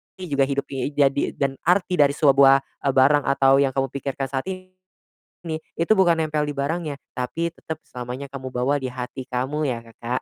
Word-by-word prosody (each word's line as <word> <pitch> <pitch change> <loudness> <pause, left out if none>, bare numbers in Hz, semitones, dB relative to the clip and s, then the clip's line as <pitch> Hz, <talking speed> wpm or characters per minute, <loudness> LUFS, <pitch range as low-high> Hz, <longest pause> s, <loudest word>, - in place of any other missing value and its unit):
juga 145 -7 0
hidup 140 0 -1
i 135 -1 -2
jadi 140 -1 +2
dan 135 -1 -2
arti 180 -1 +2
dari 140 0 +4
sebuah, 135 -2 +5 0.2
eee, 135 - +2
barang 140 +2 +5
atau 135 0 +4
yang 135 -1 +3
kamu 135 -1 0
pikirkan 135 -1 -3
saat 135 +3 -3
ini, 185 0 -10 0.8
itu 170 +5 0
bukan 175 -3 +4
nempel 155 -2 0
di 145 - -4
barangnya, 145 +1 -2 0.2
tapi 165 +7 -2
tetap 160 -1 -7
selamanya 125 +3 -7
kamu 130 -1 -6
bawa 130 +4 +1
di 130 - -3
hati 125 +1 -6
kamu 135 +4 -1
ya, 115 -2 -3
Kakak. 120 +2 -4
140 Hz, 180 wpm, -23 LUFS, 130-155 Hz, 0.8 s, sebuah